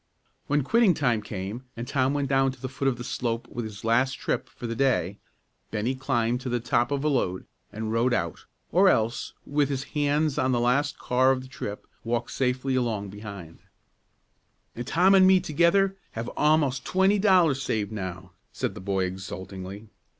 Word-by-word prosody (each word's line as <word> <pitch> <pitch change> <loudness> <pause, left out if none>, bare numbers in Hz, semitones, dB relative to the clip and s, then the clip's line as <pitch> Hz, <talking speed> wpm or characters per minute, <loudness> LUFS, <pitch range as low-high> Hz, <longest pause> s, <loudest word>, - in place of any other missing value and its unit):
When 145 0 +2
quitting 220 - +4
time 120 -7 +1
came, 105 +4 -6
and 120 +1 -5
Tom 135 0 +1
went 140 -1 0
down 135 0 +2
to 130 - -17
the 130 - -4
foot 135 +1 -3
of 130 -3 +1
the 120 - -6
slope 120 -2 -3
with 120 -1 -4
his 105 -2 -9
last 125 +4 +3
trip - - -3
for 120 - -9
the 115 0 -3
day, 105 -8 +1 0.5
Bennie 110 +4 -1
climbed 125 -2 0
to 125 - -4
the 120 0 0
top 120 0 +1
of 140 -1 -1
a - - +2
load, 105 -11 0 0.3
and 110 0 -4
rode 120 +3 +2
out, 85 -8 -2 0.3
or 190 +3 +5
else, 115 -5 0
with 145 -1 +1
his 135 -1 -2
hands 150 0 +1
on 130 0 +2
the 120 - +2
last 135 +4 +1
car 130 +1 +2
of 130 -1 +1
the - - -11
trip, 105 -5 -6 0.2
walked 120 0 -2
safely 130 +1 0
along 115 -6 -1
behind. 100 -5 -9 1.2
"And 120 +1 -6
Tom 180 +6 +4
and 190 -1 +7
me 190 0 +6
together 180 +4 +2 0.2
have 115 +1 -4
a'most 150 -4 +2
twenty 190 +2 +2
dollars 180 -9 +4
saved 110 -5 -1
now!" 95 -3 -6 0.2
said - - -3
the - - -9
boy 95 -1 0
exultingly. 95 +2 -7
125 Hz, 185 wpm, -26 LUFS, 110-145 Hz, 1.2 s, and